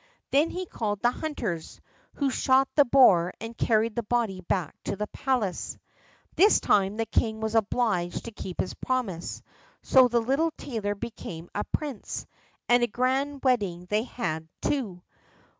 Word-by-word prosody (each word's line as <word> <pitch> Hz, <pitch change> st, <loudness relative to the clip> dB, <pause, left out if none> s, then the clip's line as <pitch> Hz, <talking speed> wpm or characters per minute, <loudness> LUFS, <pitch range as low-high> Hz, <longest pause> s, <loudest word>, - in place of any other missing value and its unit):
Then 295 Hz, +4 st, +4 dB
he 370 Hz, +1 st, -4 dB
called 210 Hz, -, -3 dB
the 240 Hz, -, +5 dB
hunters, 225 Hz, -, -4 dB, 0.4 s
who 280 Hz, -2 st, 0 dB
shot 265 Hz, +1 st, +3 dB
the 290 Hz, -, +5 dB
boar 190 Hz, -10 st, +5 dB
and 225 Hz, +2 st, -7 dB
carried 220 Hz, 0 st, +1 dB
the 235 Hz, -, 0 dB
body 220 Hz, -4 st, -1 dB
back 180 Hz, -3 st, -1 dB
to -, -, -2 dB
the 210 Hz, +2 st, -2 dB
palace. 235 Hz, -5 st, -2 dB, 0.6 s
This 410 Hz, +5 st, +6 dB
time 200 Hz, +1 st, +2 dB
the 225 Hz, -, 0 dB
king 220 Hz, 0 st, 0 dB
was 220 Hz, 0 st, -2 dB
obliged 215 Hz, -5 st, 0 dB
to 230 Hz, -, -6 dB
keep 190 Hz, -4 st, -8 dB
his -, -, -1 dB
promise; 225 Hz, -10 st, -3 dB, 0.4 s
so 260 Hz, -1 st, +6 dB
the 240 Hz, -1 st, +2 dB
little 275 Hz, +8 st, +1 dB
tailor 210 Hz, -6 st, -3 dB
became 175 Hz, -6 st, -7 dB
a 210 Hz, -, -2 dB
prince, 285 Hz, -8 st, -4 dB, 0.4 s
and 245 Hz, 0 st, +5 dB
a 240 Hz, -, +3 dB
grand 265 Hz, +4 st, 0 dB
wedding 200 Hz, -9 st, +1 dB
they 210 Hz, +1 st, +3 dB
had, 160 Hz, -10 st, -4 dB
too. 210 Hz, -12 st, -2 dB
225 Hz, 160 wpm, -27 LUFS, 195-260 Hz, 0.6 s, This